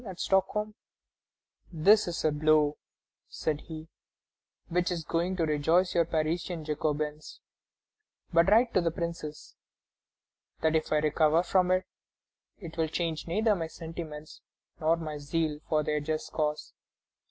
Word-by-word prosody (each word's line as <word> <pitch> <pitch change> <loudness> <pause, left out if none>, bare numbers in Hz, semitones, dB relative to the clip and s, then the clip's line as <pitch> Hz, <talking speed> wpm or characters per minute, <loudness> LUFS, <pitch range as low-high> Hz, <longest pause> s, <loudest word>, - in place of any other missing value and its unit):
at 190 -5 -8
Stockholm: 210 +2 +1 1.0
"This 195 +6 +5
is 170 -2 -3
a 155 - +4
blow," 150 0 +3 0.5
said 155 -2 -2
he, 160 -1 -8 0.8
"which 180 +1 0
is 170 -2 -2
going 170 +4 -1
to 170 -3 +1
rejoice 160 +5 +2
your 170 -1 +3
Parisian 160 +1 -2
Jacobins; 150 0 -3 0.9
but 170 +2 +5
write 230 +3 +4
to 185 - +4
the 170 - +1
Princes 165 -2 -6 1.1
that 160 0 +2
if 155 - 0
I 155 - +4
recover 155 +2 +3
from 180 0 +2
it, 185 0 +2 0.7
it 170 -4 -10
will 160 -1 +1
change 165 0 -3
neither 215 +6 +2
my 165 -3 -3
sentiments 160 -2 -8 0.4
nor 165 +1 +2
my 155 -2 -5
zeal 150 +1 -1
for 155 -1 +2
their 150 0 0
just 155 +1 -3
cause." 150 -1 -2
160 Hz, 140 wpm, -29 LUFS, 155-175 Hz, 1.1 s, This